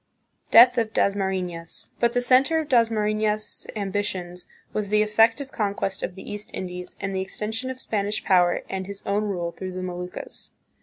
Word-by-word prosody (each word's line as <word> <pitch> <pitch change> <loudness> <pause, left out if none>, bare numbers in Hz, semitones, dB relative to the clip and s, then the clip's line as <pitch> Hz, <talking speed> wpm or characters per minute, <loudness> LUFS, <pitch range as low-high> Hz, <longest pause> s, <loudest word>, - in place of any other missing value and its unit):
Death 245 +1 +8
of 225 -1 -1
Dasmarifias. 185 -4 -1
But 235 0 +2
the 245 - +2
center 260 +6 +4
of 315 -2 -1
Dasmarifias' 215 -3 +1
ambitions 190 -3 -3 0.3
was 210 -2 -2
the 210 0 +4
effective 225 +6 +3
conquest 200 -3 -2
of 180 - -4
the 190 - -10
East 210 0 -4
Indies 180 -1 -5
and 195 -1 -3
the 190 - 0
extension 220 +6 -3
of 260 0 -6
Spanish 210 -3 -2
power 175 -2 +3
and 190 -1 -4
his 200 0 -8
own 205 +2 0
rule 175 -4 -2
through 185 +1 -6
the 185 0 -4
Moluccas. 180 0 -6
205 Hz, 165 wpm, -25 LUFS, 185-225 Hz, 0.3 s, Death